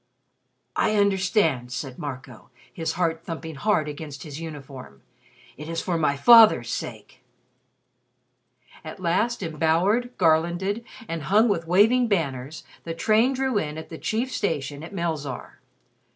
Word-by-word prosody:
"I 215 - +1
understand," 190 - +1
said 130 +1 -6
Marco, 130 -4 -8 0.2
his 165 -1 -3
heart 165 -2 -1
thumping 165 -1 -6
hard 155 0 0
against 145 -1 -7
his 150 -1 -8
uniform. 135 - -9 0.5
"It 150 +2 -8
is 165 0 -2
for 180 0 -2
my 150 -3 +1
father's 225 +7 +7
sake." - - -7 1.6
At 210 - -9
last, 190 +6 0
embowered, 170 +10 +1
garlanded, 175 +6 +1 0.2
and 165 -1 -4
hung 205 - +3
with 165 -5 -1
waving 225 +8 +4
banners, 155 - -2 0.2
the 165 -1 -5
train 225 +8 +3
drew 260 -4 0
in 150 -4 -4
at 160 - -8
the 160 - -8
chief 235 +4 -2
station 150 - -2
at 165 - -9
Melzarr. 160 -7 -4
165 Hz, 135 wpm, -24 LUFS, 150-205 Hz, 1.6 s, father's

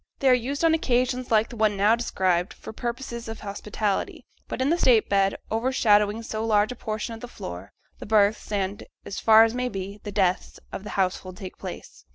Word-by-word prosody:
They 270 - +2
are - - +7
used 270 +6 0
on 325 - +5
occasions 255 -4 0
like 220 0 +3
the - - -9
one 215 -2 +1
now 210 +3 +4
described 185 -6 0
for - - -10
purposes 235 0 -5
of 225 0 -7
hospitality; 205 0 -3 0.2
but - - -5
in 265 +3 +2
the 340 - +3
state 235 -8 +4
bed, 195 -1 +2 0.2
overshadowing 220 -2 +2
so 220 0 -4
large 215 0 +2
a - - -6
portion 220 0 -4
of 225 - -8
the 245 - -8
floor, 90 - -8 0.3
the - - -8
births 210 0 +2
and, 200 -1 -2 0.2
as 195 - -5
far 220 0 +7
as 225 0 +1
may 250 0 -1
be, 195 0 -6
the 205 - -6
deaths, 190 -3 0
of - - -6
the 210 - -7
household 185 -1 -1
take 190 -3 -8
place. - - -9
220 Hz, 210 wpm, -25 LUFS, 200-240 Hz, 0.3 s, are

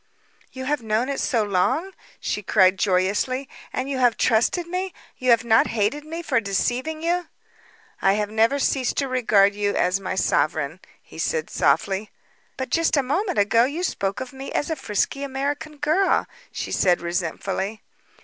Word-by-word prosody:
"You 260 0 -7
have 290 0 0
known 220 +3 0
it 280 - -2
so 230 -3 +1
long?" 210 - 0 0.3
she 210 - -2
cried 190 -1 +3
joyously. 205 +8 +1 0.2
"And 255 - -3
you 275 -2 -2
have 245 -2 +3
trusted 235 +10 +2
me? 365 +1 -4 0.2
You 255 - 0
have 235 -1 +5
not 225 -2 +4
hated 230 +8 -1
me 330 +2 -6
for 260 -7 +2
deceiving 245 +9 -1
you?" 350 +1 0 0.7
"I 195 - +4
have 210 0 -1
never 225 +5 +3
ceased 270 -2 0
to 275 - +1
regard 215 -6 +3
you 205 0 -1
as 185 +2 +2
my 190 -1 -4
sovereign," 155 -3 0 0.2
he - - -13
said 475 -1 -1
softly. 205 0 +1 0.5
"But 260 -1 -4
just 330 -2 +2
a 280 - +3
moment 355 +8 -1
ago 230 +4 +4
you 305 +7 -3
spoke 195 - -1
of 260 +1 -7
me 270 +1 -7
as 290 - -1
a - - 0
frisky 220 +3 -1
American 285 +3 -3
girl," 315 +7 +2 0.3
she - - -5
said 180 -2 +3
resentfully. 185 +4 -3
245 Hz, 170 wpm, -23 LUFS, 200-290 Hz, 0.7 s, have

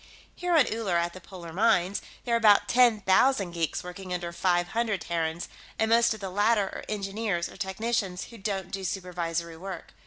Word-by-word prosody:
Here 355 -2 +1
on 290 - +6
Uller, 215 -6 -1
at 170 0 0
the 185 - -10
polar 170 -3 -10
mines, 200 -1 +2 0.2
there 240 - 0
are - - +5
about 205 -2 +5
ten 235 -1 +4
thousand 195 0 +3
geeks 165 -2 -2
working 180 +1 -8
under 175 -1 -3
five 175 0 +1
hundred 225 -4 -1
Terrans, 165 0 -2 0.3
and 220 - +1
most 230 -1 +4
of - - -11
the 195 -2 -5
latter 205 +2 +3
are - - -7
engineers 200 -3 -2
or - - -13
technicians 195 -1 -2
who 230 - -11
don't 195 -2 -3
do 195 -1 -4
supervisory 170 -3 -3
work. 185 0 -8
195 Hz, 190 wpm, -28 LUFS, 175-220 Hz, 0.3 s, on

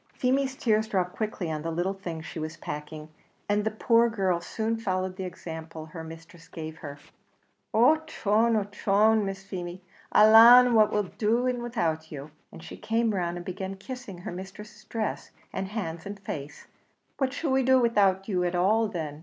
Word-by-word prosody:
Feemy's 265 +1 0
tears 220 -3 +1
dropped 180 -4 -1
quickly 210 -6 -3
on 155 -1 -3
the 165 - -3
little 175 +4 -1
things 170 -5 -7
she 160 - -7
was 155 0 -5
packing, 150 +1 -7 0.4
and 205 0 +1
the 220 - +1
poor 230 +2 +3
girl 190 -6 0
soon 220 +5 -2
followed 185 -4 -2
the 190 -1 -5
example 160 -2 -8
her 160 +1 -9
mistress 165 +1 -12
gave 160 -2 -8
her. 145 -2 -8 0.7
"Ochone! 235 -4 +3
ochone! 210 +2 +2
Miss 195 0 -5
Feemy, 180 -2 -7 0.3
alanna, 235 +3 +8
what'll 210 -1 +4
we 185 - -10
be - - -24
doing 240 +3 +1
widout 165 -10 -2
you?" 145 0 -8 0.2
and 160 - -12
she - - -9
came 225 0 0
round 175 -2 -2
and 175 - -8
began 190 +1 -5
kissing 230 -1 -8
her 175 - -7
mistress's 210 +4 -10
dress, 220 -2 -4 0.2
and 190 0 -3
hands, 180 -5 -5
and 200 0 -7
face, 150 -6 -7 0.5
"What 265 -2 +1
shall 285 +1 -2
we 265 0 +3
do 260 0 +4
widout 200 -5 +2
you 185 -4 0
at 175 0 -1
all 215 +5 +3
then? 155 -7 -5
195 Hz, 180 wpm, -27 LUFS, 170-225 Hz, 0.7 s, alanna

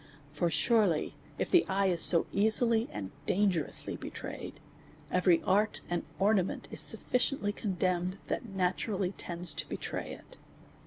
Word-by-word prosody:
For 160 +3 0
sure 225 +3 +3
ly, 160 -4 -1 0.3
if - - -2
the 355 - +6
eye 195 +1 +1
is 175 -3 +1
so 170 -2 +7
easily 220 +2 +2
and 95 -2 -6 0.2
dangerously 185 -5 +1
betrayed, - - -7 0.5
every 180 -2 +3
art 205 +3 +1
and 175 - 0 0.2
ornament 195 -2 +1
is - - -6
sufficiently 250 -4 0
condemned, 185 -2 -1
that 240 - -3
naturally 190 0 -1
tends 175 -2 -2
to - - -4
betray - - -4
it. - - -14
190 Hz, 140 wpm, -31 LUFS, 175-210 Hz, 0.5 s, so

